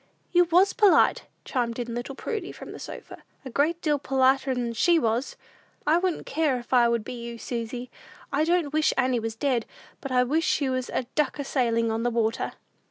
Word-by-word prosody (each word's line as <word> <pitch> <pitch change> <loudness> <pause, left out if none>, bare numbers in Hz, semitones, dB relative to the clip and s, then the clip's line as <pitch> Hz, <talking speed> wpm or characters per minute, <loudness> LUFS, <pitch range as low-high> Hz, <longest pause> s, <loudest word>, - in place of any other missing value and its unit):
"You 355 0 +5
was 360 +4 +4
polite," 420 -4 +4 0.2
chimed 240 -3 -1
in 240 -1 -4
little 240 +3 -5
Prudy, 435 - -4
from - - -10
the - - -9
sofa; - - -9 0.2
"a 260 - -6
great 315 +7 +1
deal 295 -3 +2
politer'n 260 -3 +1
she 340 +9 +4
was! 235 -1 0 0.5
I 315 +3 +4
wouldn't 365 -2 -1
care, 300 -3 +1
if 245 +1 -7
I 240 -2 +5
would 235 -2 0
be 215 - -6
you, 235 -1 -7
Susy. 240 +1 -5 0.4
I 290 +2 +2
don't 330 -3 +1
wish 310 0 +2
Annie 255 -2 +2
was 225 0 -4
dead, 245 -2 0 0.3
but 275 - -6
I 250 -1 +4
wish 305 +6 +1
she 280 -3 +1
was 255 -1 -2
a - - -1
duck 300 -2 0
a 285 - -3
sailin' 230 -4 +1
on 225 +1 -1
the 240 - +1
water!" 225 -1 -1
260 Hz, 200 wpm, -26 LUFS, 235-305 Hz, 0.5 s, You